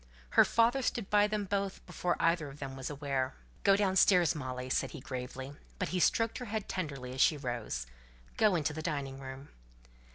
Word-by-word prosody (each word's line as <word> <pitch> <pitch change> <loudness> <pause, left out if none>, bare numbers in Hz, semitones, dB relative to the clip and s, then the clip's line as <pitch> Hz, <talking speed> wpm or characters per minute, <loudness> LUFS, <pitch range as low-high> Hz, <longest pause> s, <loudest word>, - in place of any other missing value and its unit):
Her - - +7
father 235 +4 +3
stood 230 -4 -2
by 205 0 +5
them 210 -1 -2
both 195 0 -2
before 180 0 -1
either 165 -3 +2
of 135 - -11
them 135 -2 -6
was 135 -1 -5
aware. 135 -3 -2 0.3
"Go 195 -1 +6
downstairs, 190 -4 +4
Molly," 130 -4 -5
said 130 - 0
he 155 - -8
gravely; 130 +1 -6 0.2
but 185 - -2
he 185 - -1
stroked 225 +5 +2
her 250 - -5
head 215 -2 -3
tenderly 140 -8 -4
as 130 - -1
she 155 - +5
rose. 120 - -3 0.5
"Go 210 -4 +4
into 155 -2 0
the 155 - -5
dining 140 -3 -3
room." 135 +1 -8
155 Hz, 190 wpm, -32 LUFS, 135-195 Hz, 0.5 s, Her